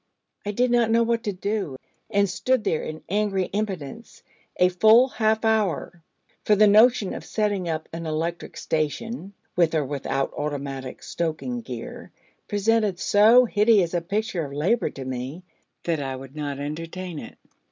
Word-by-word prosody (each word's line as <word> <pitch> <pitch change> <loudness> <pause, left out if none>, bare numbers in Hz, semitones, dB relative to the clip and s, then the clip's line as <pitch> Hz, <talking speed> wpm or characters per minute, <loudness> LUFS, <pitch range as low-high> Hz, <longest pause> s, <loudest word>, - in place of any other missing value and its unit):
I - - 0
did 245 +4 +1
not 240 -2 +3
know 230 +1 +4
what 230 0 0
to 205 - 0
do, 195 -5 -3 0.3
and 200 0 +2
stood 250 +6 0
there 165 -6 0
in 155 0 -7
angry 200 -1 0
impotence 200 -1 -5 0.3
a 180 0 +5
full 220 +8 +6
half 220 -2 +1
hour, 205 -6 0 0.4
for 210 - +4
the 215 +1 +6
notion 215 0 +5
of - - -6
setting 205 -5 -1
up 160 -1 -3
an 165 0 -5
electric 165 +2 -3
station, 190 - -3 0.2
with 170 -2 +3
or 150 -2 +1
without 135 0 -2
automatic 140 -3 -5
stoking 170 +9 -3
gear, 230 - -8 0.4
presented 210 -1 +1
so 220 +7 +6
hideous 210 -5 +3
a 175 - +1
picture 195 0 -2
of 140 -2 -7
labour 180 +12 +1
to 135 - -8
me, 130 +7 -5 0.4
that 165 -3 0
I 135 -1 -3
would 135 +2 -11
not 145 -2 -4
entertain 165 +4 -5
it. - - -10
185 Hz, 160 wpm, -24 LUFS, 155-215 Hz, 0.4 s, full